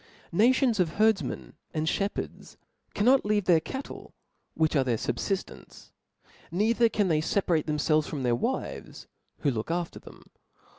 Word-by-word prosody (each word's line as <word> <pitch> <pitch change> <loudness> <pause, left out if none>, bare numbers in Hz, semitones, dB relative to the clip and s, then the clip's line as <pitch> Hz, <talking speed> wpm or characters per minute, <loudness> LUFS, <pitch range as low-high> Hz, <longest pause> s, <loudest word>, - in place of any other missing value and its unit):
Nations 240 +3 +3
of 170 -3 +1
herdfmen 215 -1 +1 0.2
and 155 0 0
fhepherds 200 +5 -3 0.4
cannot 250 +6 +4
leave 205 -2 +1
their 175 -3 +5
cattle, 265 - -8 0.4
which 160 0 +1
are 135 - +4
their 120 -3 0
fubfillence; 195 - -4 0.6
neither 225 +5 +2
can 205 -2 +1
they 155 -3 +2
feparate 170 -2 +1
themfelves 155 0 +1
from 140 -4 -4
their 120 -1 +2
wives, 120 - -3 0.4
who 145 - +2
look 110 +1 -4
after 170 0 -2
them. - - -14
175 Hz, 140 wpm, -28 LUFS, 155-210 Hz, 0.6 s, their